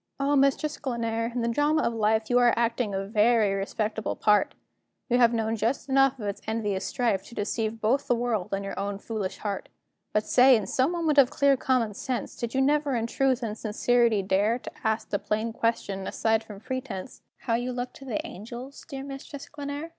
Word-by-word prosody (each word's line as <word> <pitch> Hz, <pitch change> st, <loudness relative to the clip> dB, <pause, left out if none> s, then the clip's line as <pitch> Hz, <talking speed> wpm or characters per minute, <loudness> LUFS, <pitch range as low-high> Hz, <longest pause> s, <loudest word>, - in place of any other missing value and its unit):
O, 280 Hz, +1 st, +2 dB
Mistress 275 Hz, +2 st, +2 dB
Glenare! 230 Hz, -4 st, -2 dB
in 240 Hz, 0 st, -2 dB
the -, -, 0 dB
drama 295 Hz, +6 st, +2 dB
of 235 Hz, -, 0 dB
life 220 Hz, 0 st, +1 dB
You 245 Hz, +1 st, +3 dB
are 240 Hz, -2 st, +4 dB
acting 230 Hz, -3 st, 0 dB
a 195 Hz, 0 st, -2 dB
very 215 Hz, 0 st, +3 dB
respectable 210 Hz, +2 st, -2 dB
part; 210 Hz, -1 st, +2 dB, 0.5 s
You 245 Hz, 0 st, +3 dB
have 235 Hz, -1 st, +6 dB
known 225 Hz, -1 st, 0 dB
just 230 Hz, +6 st, -1 dB
enough 270 Hz, 0 st, +3 dB
of 220 Hz, -, -6 dB
its 200 Hz, -1 st, -4 dB
envious 210 Hz, -3 st, -1 dB
strife 225 Hz, -6 st, 0 dB
To 235 Hz, -, -12 dB
deceive 220 Hz, +2 st, -2 dB
both 250 Hz, +6 st, +1 dB
the 245 Hz, -, +3 dB
world 230 Hz, -6 st, -1 dB
and 195 Hz, 0 st, -2 dB
your 195 Hz, -, -5 dB
own 200 Hz, 0 st, -2 dB
foolish 200 Hz, -2 st, -4 dB
heart. 200 Hz, -2 st, -4 dB, 0.4 s
But 210 Hz, 0 st, +1 dB
say, 255 Hz, +1 st, +6 dB
in 215 Hz, -4 st, 0 dB
some 260 Hz, -, +1 dB
moment 320 Hz, -4 st, +2 dB
of 260 Hz, -3 st, +6 dB
clear 280 Hz, -1 st, +3 dB
common 250 Hz, -5 st, +1 dB
sense, 250 Hz, +4 st, -4 dB
Did 235 Hz, +1 st, -4 dB
you 265 Hz, -, +3 dB
never 290 Hz, -1 st, +2 dB
in 230 Hz, -1 st, 0 dB
truth 260 Hz, +1 st, +1 dB
and 215 Hz, -2 st, -2 dB
sincerity 225 Hz, 0 st, +2 dB
dare 205 Hz, +4 st, +2 dB
To -, -, -9 dB
ask 220 Hz, -1 st, -1 dB
the 200 Hz, -, +1 dB
plain 220 Hz, +2 st, -2 dB
question, 200 Hz, -4 st, -1 dB
aside 225 Hz, 0 st, +1 dB
from 210 Hz, -3 st, -11 dB
pretence, 255 Hz, -4 st, -6 dB, 0.2 s
How 235 Hz, -, -1 dB
you 245 Hz, +2 st, 0 dB
looked 245 Hz, 0 st, -4 dB
to 270 Hz, -, -12 dB
the 310 Hz, +5 st, -3 dB
angels, 245 Hz, -, -9 dB
dear 270 Hz, -2 st, -5 dB
Mistress 275 Hz, +1 st, -8 dB
Glenare? 290 Hz, +2 st, -5 dB
235 Hz, 205 wpm, -27 LUFS, 215-265 Hz, 0.5 s, have